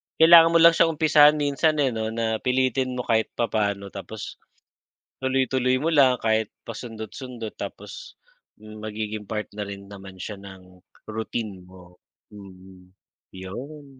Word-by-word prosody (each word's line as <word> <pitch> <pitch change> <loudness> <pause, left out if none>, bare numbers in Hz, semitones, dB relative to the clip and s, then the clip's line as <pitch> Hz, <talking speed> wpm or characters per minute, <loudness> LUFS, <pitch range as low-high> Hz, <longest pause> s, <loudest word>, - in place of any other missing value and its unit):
kailangan 165 0 +7
mo - - +9
lang 170 - +9
siyang 165 -1 +2
umpisahan 150 -1 +6
minsan, 150 +2 +1
eh, 130 - +1
‘no, 110 -1 -3
na 110 0 -2
pilitin 130 0 0
mo 125 - -3
kahit 110 -1 +1
papaano 100 -4 -1
tapos 100 +2 -8 0.8
tuloy-tuloy 130 -1 +1
mo 160 +4 0
lang 130 -4 +5
kahit 110 -1 0 0.2
pasundot-sundot 115 +1 -7
tapos - - -9 0.4
magiging 110 0 -6
part 105 -1 -3
na 105 - -4
rin 100 -1 -8
naman 95 -2 -12
siya 105 +3 -6
ng 95 -2 -14 0.2
routine 110 -3 -5
mo, 90 -1 -16 0.4
mm. 95 -2 -14 0.4
‘Yon, 125 +11 -9
110 Hz, 135 wpm, -24 LUFS, 100-130 Hz, 0.8 s, mo